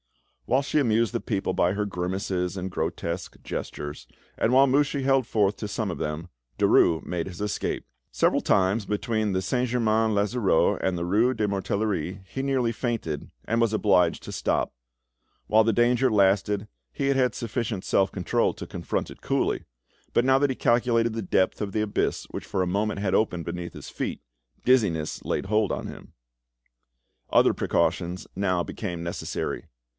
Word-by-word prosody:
Whilst 135 +2 +2
she 155 - +2
amused 115 -3 +2
the 120 - -1
people 100 -4 -1
by 90 +2 +2
her 105 +1 -1
grimaces 90 -1 -2
and 95 0 -4
grotesque 85 0 -3
gestures, 75 0 -5 0.3
and 115 - +2
while 135 +2 +7
Mouchy 140 +1 +2
held 135 -2 +3
forth 105 -2 +2
to 105 - -4
some 105 0 -2
of - - -5
them, 75 +3 -3 0.3
Derues 80 -1 +4
made 85 -1 -3
his 90 -2 -8
escape. 105 0 -2 0.3
Several - - +2
times 95 +3 +2
between 105 -2 0
Saint 125 +7 0
Germain 110 -2 +2
l'Auxerrois 100 -3 +2
and 95 -2 0
the 85 - -2
rue 110 +8 +3
de 110 - -1
la 105 - +1
Mortellerie 100 -2 -1
he 135 - -4
nearly 135 -4 +1
fainted, 110 - -3 0.2
and 115 +1 +1
was 115 -2 +3
obliged 95 -6 +3
to - - -7
stop. - - 0 0.7
While 110 +1 +5
the 115 - +3
danger 120 +3 +3
lasted, 100 0 +2 0.2
he 135 - -2
had 140 - +3
had 125 -4 +2
sufficient 115 -3 -3
self 95 0 +2
control 90 -3 0
to - - -7
confront - - -3
it - - -13
coolly, - - 0 0.5
but 120 - +3
now 135 0 +5
that 145 0 +2
he 130 - -1
calculated 115 -1 +2
the 115 - -3
depth 95 0 +1
of 100 -1 -2
the 110 - +1
abyss 105 -1 -1
which - - -5
for 95 - -1
a - - -2
moment 100 +3 0
had 100 -2 -1
opened 90 -6 +1
beneath 85 0 -5
his - - -9
feet, - - -4 0.5
dizziness 100 -12 +2
laid - - -2
hold 105 +1 +1
on - - -3
him. - - -11 1.2
Other - - +5
precautions 90 +1 0
now 90 -3 +1
became 90 -4 -5
necessary. 85 - -4
105 Hz, 175 wpm, -26 LUFS, 95-115 Hz, 1.2 s, while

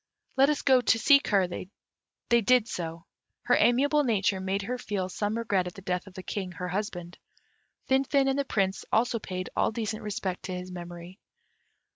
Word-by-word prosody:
Let 270 +2 +5
us 300 - 0
go 260 -2 +5
to 225 - +3
seek 280 +5 +5
her." 195 -3 +3
They 205 +5 -4
did 245 +1 +4
so. 165 -5 -5 0.4
Her - - +3
amiable 285 +5 +3
nature 205 -6 +1
made 190 +1 -2
her 250 +4 -3
feel 195 -5 -3
some 205 +4 -2
regret 200 -6 0
at 180 - -8
the 195 - -11
death 180 0 -2
of 190 - -13
the 185 - -7
King, 190 -2 -4
her 180 +2 -5
husband. 180 -3 -4 0.7
Finfin 270 +1 +2
and 270 +1 +1
the - - +2
Prince 195 -7 -1
also 230 +1 +2
paid 185 -3 -5
all - - +2
decent 220 -1 -3
respect 195 -3 -3
to 185 - -4
his 180 0 -7
memory. 175 +2 -9
200 Hz, 185 wpm, -28 LUFS, 185-240 Hz, 0.7 s, Let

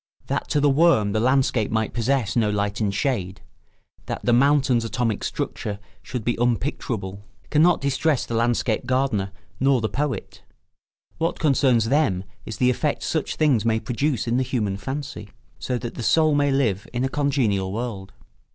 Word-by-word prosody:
That - - -2
to 150 - +1
the 145 - +3
worm 140 -8 +4
the 110 - 0
landscape 130 -2 +2
might 110 -1 -1
possess 120 -1 0
no 110 -3 +2
light 100 -1 -1
and 105 -2 +1
shade, 100 -5 -2 0.7
that - - -5
the 120 - +3
mountain's 130 -2 +3
atomic 115 -1 -1
structure 105 -1 -3 0.2
should 125 -3 -5
be 120 - +1
unpicturable, 115 -5 -2 0.3
cannot 160 +3 +4
distress 140 +1 +1
the - - -6
landscape 115 0 0
gardener 130 -7 0 0.3
nor 135 0 +3
the 110 -1 -1
poet; 140 -7 -3 0.8
what 165 +1 0
concerns 130 -6 +2
them 135 -11 +2 0.2
is 110 - -5
the 125 +3 +3
effect 145 +4 -1
such 160 -3 -2
things 140 -9 +2
may 110 -1 +1
produce 125 +1 -1
in 120 +1 +1
the 130 - +2
human 105 -6 -1
fancy, 130 0 -6 0.3
so 125 - -2
that 120 -1 -6
the - - -7
soul 155 +5 +3
may 145 0 +2
live 115 -8 0
in 120 +1 -2
a - - +2
congenial 130 -10 0
world. 105 -3 -5
120 Hz, 170 wpm, -23 LUFS, 110-140 Hz, 0.8 s, worm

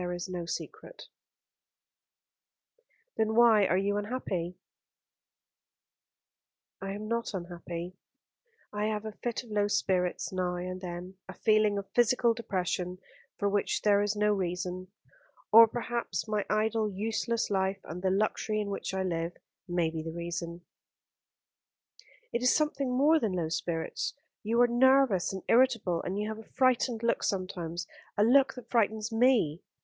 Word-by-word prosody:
"There 180 0 -3
is 175 +2 -4
no 175 -2 -5
secret." - - -7 2.1
"Then 220 0 +1
why 225 -4 +6
are 185 - +2
you 200 +1 0
unhappy?" 195 -6 -3 2.2
"I 195 0 -4
am 210 +1 -6
not 230 -2 -2
unhappy. 175 0 -6 0.8
I 210 0 -1
have 215 0 -2
a 220 - -4
fit 235 +3 -4
of 235 - -14
low 205 -1 +2
spirits 185 -3 0
now 180 -1 -1
and 185 +1 -5
then, 180 +1 -7
a 190 - -8
feeling 215 -1 +3
of 200 -1 -4
physical 240 0 +3
depression, 185 -5 -2 0.4
for 200 - 0
which 200 0 0
there 205 -1 +4
is 205 0 0
no 210 0 +2
reason; 180 -1 -3 0.6
or 230 +1 +10
perhaps 235 0 -3
my 210 -1 -1
idle, 215 0 +1
useless 225 +3 -1
life, 190 0 0
and 170 +3 -7
the 190 - +1
luxury 215 +2 0
in 205 -1 -2
which 195 - -4
I 190 - 0
live, 170 -1 -2 0.3
may 175 -2 0
be 160 -1 -4
the 165 +1 -5
reason." 170 0 -5 1.7
"It 235 - 0
is 250 - +4
something 295 -3 0
more 290 +6 +4
than 220 -8 -1
low 170 -3 -1
spirits. 170 - -3 0.3
You 230 +3 +1
are 245 - +6
nervous 245 -5 +4
and 190 -1 -6
irritable 230 -8 +3
and 190 +2 -3
you 210 +1 -1
have 220 0 -5
a 220 - -14
frightened 250 -3 +2
look 230 - +1
sometimes, 180 -3 -3 0.3
a 205 - +4
look 270 +4 +4
that 250 - -11
frightens 220 -1 +1
me. 225 - +3
205 Hz, 150 wpm, -30 LUFS, 180-230 Hz, 2.2 s, or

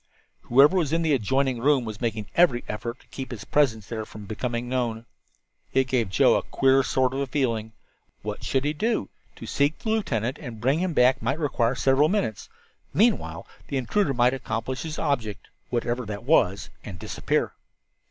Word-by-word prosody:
Whoever 140 +8 +6
was 165 -6 +1
in 165 +1 +1
the 160 -2 +2
adjoining 130 +1 +1
room 135 -2 +3
was 110 0 -7
making 110 -3 -2
every 165 -9 +4
effort 115 +4 -5
to - - -25
keep 135 -1 -6
his 120 -5 -7
presence 115 -8 +2
there 110 0 -4
from 105 -1 -10
becoming 120 +3 -3
known! 120 -3 -2 0.7
It 135 - +4
gave 120 -5 0
Joe 95 - +4
a - - 0
queer 135 0 +3
sort 130 0 +1
of 135 0 -2
feeling. 115 -6 -1 0.5
What - - -5
should 135 +1 0
he 150 - +1
do? 215 - -1 0.3
To - - -9
seek 145 +2 +1
the 220 - -5
lieutenant 130 - -1
and 120 -7 -8
bring 135 +7 +2
him 180 -1 -1
back 125 -2 +4
might 130 +6 0
require 130 -6 0
several 135 +5 +3
minutes. 190 - -2 0.5
Meanwhile 170 - +2 0.2
the 140 - -2
intruder 135 - 0
might 120 +1 +4
accomplish 130 0 -3
his 155 -2 -5
object 115 - -2 0.2
whatever 120 -2 -2
it 100 +1 -6
was 105 - +2
and 95 -4 -8
disappear. - - -1
130 Hz, 180 wpm, -25 LUFS, 115-145 Hz, 0.7 s, Whoever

